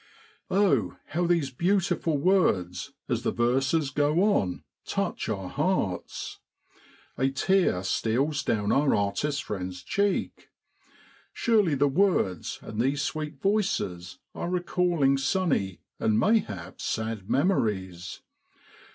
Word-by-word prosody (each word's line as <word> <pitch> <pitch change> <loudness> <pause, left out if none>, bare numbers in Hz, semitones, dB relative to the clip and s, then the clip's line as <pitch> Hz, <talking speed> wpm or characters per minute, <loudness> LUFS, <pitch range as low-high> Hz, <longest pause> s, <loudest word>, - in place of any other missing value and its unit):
Oh! 140 - +2
how 175 +2 0
these 165 -6 +1
beautiful 175 0 +1
words, 140 - +1 0.2
as - - -1
the - - 0
verses 135 +5 +1
go 150 +6 +2
on, 100 - +1 0.2
touch - - -2
our 95 -4 -3
hearts. 145 - -2 0.8
A 135 +1 +3
tear 135 - +2
steals 130 +10 0
down 105 -2 0
our 140 0 +3
artist 135 +8 -1
friend's 90 -2 -5
cheek. 200 -1 -1 0.8
Surely 210 -10 +2
the 145 +1 +3
words 140 - +1
and 110 +1 -3
these 140 +3 +1
sweet 155 -2 -4
voices 160 - -1 0.2
are 175 - -4
recalling 175 -6 +1
sunny, 135 - 0 0.2
and 110 0 +2
mayhap 160 - 0
sad 110 -3 -3
memories. 95 - 0
140 Hz, 110 wpm, -27 LUFS, -, 0.8 s, A